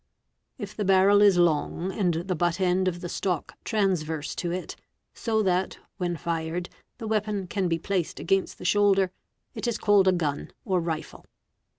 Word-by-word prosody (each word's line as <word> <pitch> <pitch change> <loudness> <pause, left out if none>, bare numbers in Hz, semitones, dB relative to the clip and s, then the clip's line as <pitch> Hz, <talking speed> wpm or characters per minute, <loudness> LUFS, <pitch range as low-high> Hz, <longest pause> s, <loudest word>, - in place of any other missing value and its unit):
If 205 -5 -7
the 210 - -2
barrel 195 +1 +5
is 200 -3 +6
long 175 +2 +1
and 180 -5 0
the 175 +3 -2
butt 175 +1 0
end 185 0 +2
of 175 -1 -2
the 175 - -4
stock 180 -2 -2
transyerse 160 -8 -1
to 175 - -2
it, 180 +1 -4 0.4
so 220 -2 0
that, 185 -1 0 0.2
when 175 -2 -2
fired, 165 +2 -3 0.3
the 230 - -7
weapon 210 -2 -1
can 190 +1 -1
be 165 -1 +1
placed 180 0 -2
against 195 +2 0
the - - -10
shoulder, 195 0 +3 0.4
it - - -4
is 235 -2 0
called 205 -3 +4
a - - +7
gun 155 -5 -2 0.2
or 185 -2 +1
rifle. 160 -2 -5
185 Hz, 175 wpm, -26 LUFS, 170-200 Hz, 0.4 s, a